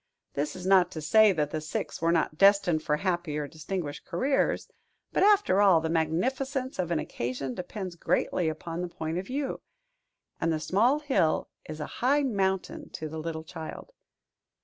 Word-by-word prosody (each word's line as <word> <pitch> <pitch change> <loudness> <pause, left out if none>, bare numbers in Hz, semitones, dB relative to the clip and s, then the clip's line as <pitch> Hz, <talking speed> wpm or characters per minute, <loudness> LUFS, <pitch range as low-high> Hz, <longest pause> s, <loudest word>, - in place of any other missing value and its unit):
This 145 +1 -2
is 185 - -8
not 185 -2 +5
to 160 - -5
say 215 +7 +5
that 150 -5 -1
the 155 - -2
six 155 - -4
were 165 0 +3
not 165 -2 +1
destined 195 -3 +4
for 150 -1 0
happy 175 -4 -1
or 150 -1 -2
distinguished 155 0 -5
careers; 265 +11 0 0.5
but, - - +1
after 400 - +5
all, 190 -5 +6
the 160 0 -2
magnificence 255 - -1
of 175 -2 0
an 170 - +1
occasion 125 -1 -3
depends 180 - -6
greatly 170 0 0
upon 165 +2 -5
the 180 - -2
point 165 0 -4
of 190 - -7
view; 275 +1 -3 0.8
and 165 - +1
the 155 - 0
small 220 - +2
hill 200 - +1 0.2
is 155 0 -6
a 150 - -3 0.2
high 280 +4 +3
mountain 190 -7 -1
to 155 - -4
the 160 +1 -6
little 160 0 -4
child. 160 - -8
175 Hz, 175 wpm, -28 LUFS, 155-200 Hz, 0.8 s, all